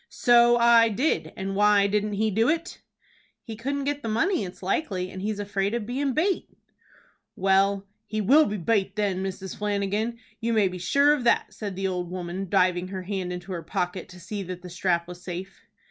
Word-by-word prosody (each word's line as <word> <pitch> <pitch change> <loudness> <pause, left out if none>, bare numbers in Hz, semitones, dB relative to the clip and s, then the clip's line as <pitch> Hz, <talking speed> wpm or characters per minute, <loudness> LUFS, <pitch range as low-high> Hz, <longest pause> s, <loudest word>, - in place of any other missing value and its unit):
"So 240 -1 +5
I 235 -1 +6
did, 255 +9 0
and 195 0 -3
why 205 0 +4
didn't 210 +1 0
he 215 +2 0
do 225 +6 +2
it?" 335 +2 -2 0.6
"He 225 - -7
couldn't 280 +5 -3
get 290 +1 -2
the 225 - -4
money, 320 - +1
it's 180 0 -9
likely, 185 -3 -1
and 185 - -7
he's 210 +1 -2
afraid 200 +1 -1
of 235 -3 -3
bein' 265 +3 -1
bate." 360 +7 0 0.9
"Well, 195 +1 +2 0.2
he 215 0 -3
will 280 +10 +5
be 210 - -3
bate 195 +1 0
then, 200 -3 0
Mrs. 190 -1 -5
Flanagan, 210 +3 -1 0.2
you 230 +1 -1
may 215 -3 +4
be 180 0 -7
sure 280 +11 +4
of 290 -4 -2
that," 235 - +2
said 205 -3 -5
the 195 +1 -3
old 180 -2 -3
woman, 180 +1 -5
diving 180 -2 +2
her 185 -1 -6
hand 185 -1 -3
into 180 +1 -6
her 175 -2 -3
pocket 180 +3 -3
to 180 0 -12
see 205 +3 -5
that 180 -1 -7
the 180 - -9
strap 170 -1 0
was 180 0 -10
safe. 185 +2 -7
200 Hz, 200 wpm, -26 LUFS, 185-230 Hz, 0.9 s, I